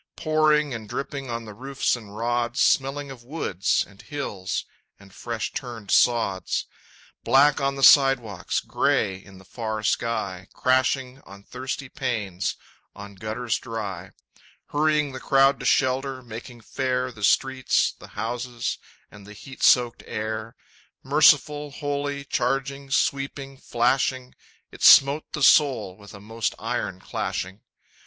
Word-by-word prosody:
Pouring 155 -2 +2
and 110 -3 -7
dripping 140 -1 -5
on 115 -1 -4
the 105 - -9
roofs 135 +5 -1
and 105 -3 -11
rods, 120 +2 -1
Smelling 135 +1 +1
of 125 -3 -11
woods 120 - -1
and 100 -1 -17
hills 105 -11 -4 0.3
and 100 -1 -17
fresh 115 0 -4
turned 115 -6 -6
sods, 115 -6 +2 0.6
Black 140 +4 +4
on 135 0 0
the 135 - -4
sidewalks, 130 -11 +4
gray 95 -2 0
in 95 0 -14
the 95 - -16
far 110 0 -5
sky, 100 -5 -2
Crashing 130 0 0
on 100 0 -14
thirsty 130 +4 -5
panes, 105 -8 -3 0.4
on 100 0 -10
gutters 110 +4 -3
dry, 100 -6 -6 0.6
Hurrying 150 -1 +1
the 130 - -7
crowd 135 0 +3
to - - -3
shelter, 130 0 +1
making 120 +1 -10
fair 125 +1 -2
The 110 -3 -11
streets, 130 +5 +2
the - - -12
houses, 120 +1 -3 0.3
and 105 -1 -14
the 105 - -10
heat 135 +6 -12
soaked 120 -2 +4
air, 110 +1 -4 0.5
Merciful, 150 +1 +4
holy, 145 -1 -3
charging, 135 +2 -2
sweeping, 135 0 -1
flashing, 130 +1 0 0.4
It - - -14
smote 140 +3 +6
the 150 - -2
soul 135 -13 +4
with 100 0 -14
a - - -11
most 110 +1 -3
iron - - -3
clashing!... 95 +3 -4
125 Hz, 135 wpm, -24 LUFS, 110-135 Hz, 0.6 s, smote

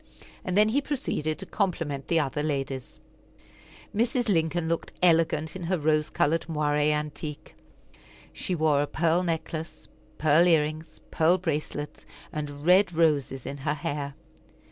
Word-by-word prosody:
And 185 +1 -1
then 210 +1 +6
he 275 +6 +2
proceeded 245 - -2
to 195 - -8
compliment 165 -9 -2
the 165 - +3
other 145 0 -1
ladies. 135 -3 -3 1.0
Mrs. 240 +2 +1
Lincoln 165 -2 +1
looked 165 0 -2
elegant 160 -2 +3
in 190 - -6
her 185 +2 +1
rose 155 0 +1
colored 160 +3 +1
moiré 150 -1 +1
antique. 150 0 -4 0.8
She 185 - -2
wore 155 -3 +3
a 145 - -1
pearl 165 +3 +1
necklace, 165 -1 -4 0.3
pearl 155 +3 +4
ear 165 -3 +6
rings, 155 +2 -7
pearl 165 +3 +4
bracelets, 150 -4 -4 0.3
and 145 -1 -5
red 185 +2 +5
roses 145 -5 +1
in 140 - -5
her 145 +2 -1
hair. 145 -1 -4
155 Hz, 145 wpm, -27 LUFS, 150-175 Hz, 1.0 s, then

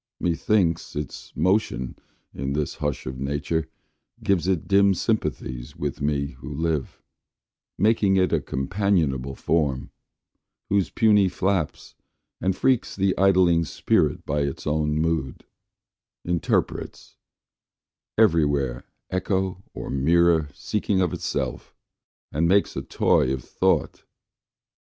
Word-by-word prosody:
Methinks, 85 0 +1
its 75 -1 -6
motion 80 - 0 0.4
in 70 0 -3
this 75 0 -1
hush 75 -2 -3
of 65 0 -5
nature 75 +4 -2 0.5
Gives 95 -3 +1
it 95 -4 0
dim 100 0 +4
sympathies 75 - -2
with 70 -1 -4
me 70 -1 0
who 65 +2 -8
live, 80 -1 -2 0.7
Making 100 -1 +3
it 95 -1 +2
a - - +2
companionable 70 -4 0
form, 70 -5 0 0.8
Whose 100 -2 +2
puny 105 -4 +4
flaps 95 -4 -2 0.5
and 95 0 +1
freaks 130 -3 +1
the 95 -1 +1
idling 90 -3 +4
Spirit 75 - 0
By 75 +1 -1
its 70 -1 -3
own 75 0 0
moods 80 -4 -1 0.8
interprets, 85 -2 -2 1.0
every 95 -8 +5
where 70 -4 -1 0.3
Echo 95 0 -1
or - - -5
mirror 80 +2 +3
seeking 100 +5 -1
of 90 -3 +1
itself, - - -3 0.6
And 80 +3 +1
makes 100 +3 +3
a - - -2
toy 65 - +2
of 65 -1 -3
Thought. - - 0
80 Hz, 115 wpm, -24 LUFS, 70-95 Hz, 1.0 s, every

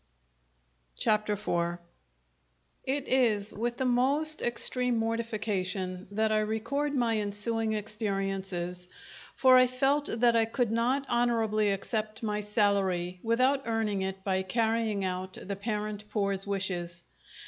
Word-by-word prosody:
Chapter 210 -1 +2
Four 175 -4 -1 1.1
It 270 +1 -2
is 225 -5 +2
with 240 +2 -2
the 260 - -1
most 275 +5 +2
extreme 245 0 +1
mortification 205 -5 -2
that 215 +2 0
I 215 - +3
record 255 +7 -1
my 230 -4 +1
ensuing 220 +2 -1
experiences, 195 -4 -3 0.5
for 255 -1 +6
I 255 0 +6
felt 270 +3 +1
that 235 0 +3
I 225 -1 +4
could 230 0 -1
not 250 +4 +1
honourably 225 -3 +1
accept 215 +2 -3
my 210 -1 -1
salary 200 -4 0
without 255 +4 +1
earning 220 -3 0
it 190 0 -4
by 190 -1 0
carrying 220 0 0
out 185 0 -4
the 200 - -5
parent 210 0 -4
Poor's 200 -2 -1
wishes. 175 -3 -2
215 Hz, 125 wpm, -29 LUFS, 195-235 Hz, 1.1 s, for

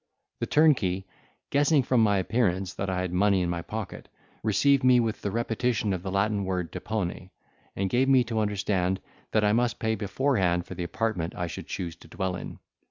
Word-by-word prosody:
The - - -2
turnkey, 110 - +3 0.5
guessing 145 0 +4
from 125 -1 +2
my 105 -2 +4
appearance 95 -2 0
that 95 - -3
I 90 -1 -1
had 90 -1 -3
money 95 0 +3
in 85 - -1
my 85 -1 -2
pocket, 105 +2 -6 0.3
received 135 +6 +3
me 125 -1 +6
with 115 -2 -1
the 100 - -2
repetition 115 -1 0
of 90 - -3
the 95 - -5
Latin 100 +1 +1
word 90 -3 -2
depone, 95 -4 -4 0.5
and 95 - 0
gave 130 +6 +2
me 130 -2 +6
to 115 -2 -2
understand, 95 -3 0 0.3
that 110 - +2
I 105 0 +3
must 120 +1 +1
pay 110 0 0
beforehand 100 -4 0
for - - -8
the 90 -1 -4
apartment 90 -2 -2
I 90 - -2
should 85 - -7
choose 85 -3 -4
to - - -16
dwell 95 -2 -3
in. - - -7
100 Hz, 195 wpm, -27 LUFS, 95-115 Hz, 0.5 s, me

